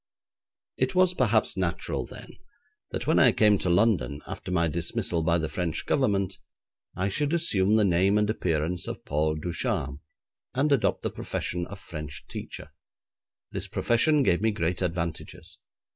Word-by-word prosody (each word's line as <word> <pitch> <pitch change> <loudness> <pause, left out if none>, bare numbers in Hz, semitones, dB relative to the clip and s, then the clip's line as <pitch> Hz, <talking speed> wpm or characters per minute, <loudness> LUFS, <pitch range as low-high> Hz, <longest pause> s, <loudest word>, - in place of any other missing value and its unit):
It - - 0
was 185 0 +4
perhaps 115 - +2
natural 90 -3 -2
then, - - -10 0.6
that - - -4
when - - +3
I - - +7
came 105 -3 +4
to 90 - -1
London 90 -6 +2
after - - -7
my 85 -2 +2
dismissal 85 +1 -1
by 85 +1 +2
the 80 -1 -1
French 85 0 -3
Government, 100 -7 +1 0.6
I 95 +2 0
should 145 - -1
assume 105 - +2
the 110 -1 +4
name 95 +3 +3
and 105 0 +2
appearance 85 -4 -1
of - - -6
Paul 75 +1 0
Ducharme, 75 -3 -2 0.5
and 145 +3 +2
adopt 140 -5 +2
the - - -1
profession 90 0 -3
of 100 0 -9
French 75 -4 -8
teacher. 75 - -8 0.8
This - - -4
profession 145 +5 +2
gave 85 -6 +2
me 110 - +3
great 90 -4 -1
advantages. 85 -2 -4
90 Hz, 155 wpm, -27 LUFS, 85-110 Hz, 0.8 s, I